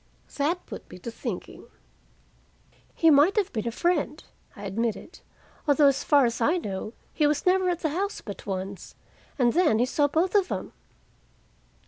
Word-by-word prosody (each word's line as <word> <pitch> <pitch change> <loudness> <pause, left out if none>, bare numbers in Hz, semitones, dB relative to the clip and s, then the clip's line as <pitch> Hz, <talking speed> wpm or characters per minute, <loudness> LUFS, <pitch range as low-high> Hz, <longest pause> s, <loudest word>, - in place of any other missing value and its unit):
That 320 +5 0
put - - -9
me - - -10
to 230 +6 -7
thinking. - - -7 1.3
"He 325 -1 +5
might 295 +7 +5
have 415 -4 0
been 225 -1 -2
a - - -1
friend," 310 +1 -1 0.3
I 200 - -10
admitted. 225 - -3 0.5
"Although, 290 0 +5
as 275 0 +3
far 285 -3 +5
as 235 0 -2
I 315 +10 +3
know, 210 - -5 0.2
he 300 - +2
was 295 0 0
never 370 0 +3
at 350 -1 -2
the 315 - 0
house 390 +7 -2
but 200 -1 -9
once, 190 0 -5 0.4
and 245 -4 +3
then 320 -10 +3
he 240 - +3
saw 285 +3 +1
both 330 +6 0
of 400 -3 +3
them." - - -5
290 Hz, 170 wpm, -26 LUFS, 230-345 Hz, 1.3 s, He